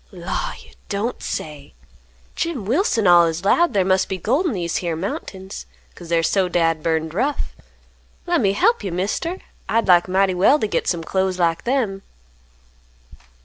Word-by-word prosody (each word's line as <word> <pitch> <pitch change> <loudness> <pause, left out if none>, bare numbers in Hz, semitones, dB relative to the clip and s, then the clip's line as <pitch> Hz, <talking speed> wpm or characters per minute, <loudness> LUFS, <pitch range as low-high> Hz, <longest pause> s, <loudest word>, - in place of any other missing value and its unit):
"Law, 190 - -4
you - - -18 0.2
don't 210 +4 -2
say! 150 - -6 0.6
Jim 310 - -3
Wilson 235 - +1
allus 170 0 +4
'lowed 340 +7 +3
thar 190 -2 +3
must 190 0 +2
be 190 - -2
gold 265 - 0
in 300 - -1
these 170 -4 -2
here 170 -2 -2
mountains, 190 +2 -6 0.3
'cause 170 -2 -12
they're 165 -1 +2
so 185 +2 +1
dad 165 -2 +1
burned 160 0 -1
rough. 270 - -2 0.7
Lemme 320 - +2
hep 455 - +2
you, 195 - -3
Mister. 205 - -2 0.3
I'd 230 +1 +1
like 175 -1 +5
mighty 190 +1 +2
well 195 +11 +4
t' 215 - -1
git - - -2
some 170 -2 -1
clothes 190 +2 -1
like 170 -2 0
them." 235 -7 0
190 Hz, 160 wpm, -21 LUFS, 170-230 Hz, 0.7 s, like